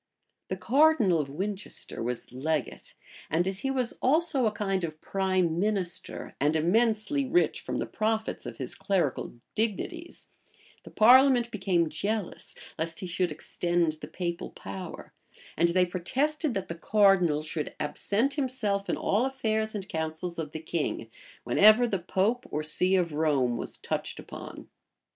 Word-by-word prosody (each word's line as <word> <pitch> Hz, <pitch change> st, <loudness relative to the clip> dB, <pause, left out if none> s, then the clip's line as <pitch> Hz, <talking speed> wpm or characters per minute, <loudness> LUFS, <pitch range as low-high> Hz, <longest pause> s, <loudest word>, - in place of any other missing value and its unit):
[] -, -, -52 dB
The -, -, -3 dB
cardinal 260 Hz, -, +4 dB
of 140 Hz, -2 st, -2 dB
Winchester 195 Hz, -, -5 dB
was 120 Hz, +1 st, -4 dB
legate; 140 Hz, +1 st, -3 dB, 0.3 s
and 170 Hz, +4 st, +1 dB
as 190 Hz, 0 st, -2 dB
he 270 Hz, -, -2 dB
was 255 Hz, -3 st, -1 dB
also 295 Hz, -3 st, +3 dB
a -, -, +1 dB
kind 195 Hz, -3 st, -1 dB
of 155 Hz, -2 st, -4 dB
prime 185 Hz, -3 st, 0 dB
minister, 195 Hz, -3 st, -2 dB
and 150 Hz, +3 st, +2 dB
immensely 220 Hz, -, +2 dB
rich 310 Hz, +7 st, +2 dB
from -, -, -3 dB
the -, -, -1 dB
profits 220 Hz, -, -2 dB
of 120 Hz, -2 st, -7 dB
his 130 Hz, -2 st, -4 dB
clerical 190 Hz, -12 st, -1 dB, 0.2 s
dignities, 280 Hz, -, -3 dB, 0.5 s
the -, -, -12 dB
parliament 245 Hz, +1 st, +6 dB
became 180 Hz, -6 st, +1 dB
jealous 200 Hz, +5 st, -3 dB, 0.2 s
lest 165 Hz, 0 st, -3 dB
he -, -, -4 dB
should 180 Hz, -1 st, 0 dB
extend 170 Hz, +2 st, 0 dB
the -, -, -6 dB
papal 170 Hz, -1 st, -4 dB
power; 185 Hz, -3 st, -8 dB, 0.4 s
and 170 Hz, +2 st, +3 dB
they 180 Hz, +1 st, +3 dB
protested, 265 Hz, -, -1 dB
that 195 Hz, -, -2 dB
the -, -, -4 dB
cardinal 180 Hz, -4 st, +3 dB
should 155 Hz, 0 st, -4 dB
absent 205 Hz, -, 0 dB
himself 245 Hz, -8 st, -1 dB
in -, -, 0 dB
all 225 Hz, +6 st, +1 dB
affairs 220 Hz, -5 st, -1 dB
and 195 Hz, -2 st, -4 dB
councils 160 Hz, +1 st, -4 dB
of 155 Hz, -2 st, -4 dB
the 160 Hz, -, -5 dB
king, 150 Hz, -8 st, -3 dB, 0.3 s
whenever 215 Hz, -, +6 dB
the 200 Hz, -5 st, -1 dB
pope 210 Hz, +9 st, 0 dB
or 155 Hz, -, -2 dB
see 180 Hz, +5 st, +3 dB
of 175 Hz, -4 st, +1 dB
Rome 145 Hz, -6 st, +2 dB
was -, -, -5 dB
touched -, -, -4 dB
upon. -, -, -9 dB
190 Hz, 155 wpm, -28 LUFS, 160-225 Hz, 0.5 s, parliament